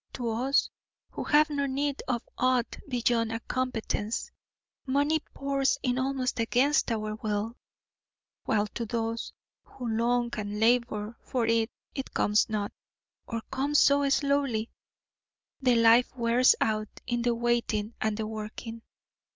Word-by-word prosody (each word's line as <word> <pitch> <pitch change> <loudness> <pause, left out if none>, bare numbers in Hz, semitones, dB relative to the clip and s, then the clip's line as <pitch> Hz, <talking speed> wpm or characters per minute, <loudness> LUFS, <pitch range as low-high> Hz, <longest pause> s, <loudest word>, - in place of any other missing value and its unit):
To 240 -2 -3
us 260 +5 +1 0.4
who - - -5
have 300 +1 +4
no 280 -1 0
need 280 +1 -1
of 250 -3 -2
aught 255 -1 +1
beyond 235 -2 +1
a 225 - -2
competence, 235 -4 -2 0.6
money 285 +4 +2 0.2
pours 275 0 +1
in 250 -1 +1
almost 260 -2 -1
against 250 +5 +2
our 215 -1 -2
will, 215 0 -2 0.9
while 210 -1 +2
to 215 +3 -5
those 230 0 -2 0.3
who 250 - -9
long 235 +2 +1
and 205 0 -4
labour 230 -1 +1
for 245 -3 -1
it, 225 0 +2 0.2
it 270 -2 -6
comes 210 +2 +3
not, 210 -2 -2 0.6
or 230 -1 -3
comes 280 +3 +1
so 280 0 +5
slowly 275 -5 +1 0.9
the 250 -2 +4
life 230 +2 +5
wears 240 +1 +4
out 215 -1 0 0.2
in 240 -1 -1
the 240 0 +1
waiting 235 -2 0
and 215 -1 0
the 220 - -2
working. 220 +1 -6
235 Hz, 135 wpm, -28 LUFS, 225-265 Hz, 0.9 s, so